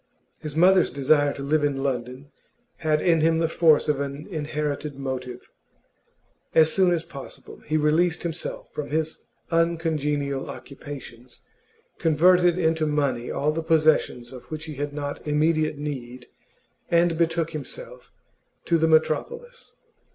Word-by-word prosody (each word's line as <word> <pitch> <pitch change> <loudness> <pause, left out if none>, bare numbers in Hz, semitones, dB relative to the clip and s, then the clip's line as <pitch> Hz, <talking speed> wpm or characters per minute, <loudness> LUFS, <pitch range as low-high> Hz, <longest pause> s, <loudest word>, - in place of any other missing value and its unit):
His 150 -1 -5
mother's 185 +2 +5
desire 145 +2 +2
to 140 - -7
live 150 +2 +1
in 140 -2 0
London 130 +1 -4 0.5
had 155 -2 0
in 165 -3 +3
him 165 +1 +3
the 165 0 +1
force 160 -2 +3
of 150 -2 +1
an 140 +1 -4
inherited 150 -2 -3
motive; 130 -2 -6 1.0
as 160 0 +5
soon 185 -2 +3
as 170 -2 0
possible 140 -4 -11
he 155 - +1
released 160 +3 +2
himself 165 -1 -5
from 150 - -5
his 155 +1 -2 0.3
uncongenial 150 -5 0
occupations, 130 -3 -10 0.6
converted 175 +2 +4
into 160 -2 +1
money 140 -5 -1
all 150 +2 0
the 165 +2 -2
possessions 155 -6 +2
of 125 - -10
which 155 0 -7
he 155 - -7
had 145 +1 -4
not 145 0 -5
immediate 155 0 +1
need, 130 -4 -6 0.6
and 170 0 +3
betook 165 0 0
himself - - -8 0.5
to 170 -1 +2
the 160 - +3
metropolis. 475 - 0
155 Hz, 135 wpm, -24 LUFS, 140-165 Hz, 1.0 s, mother's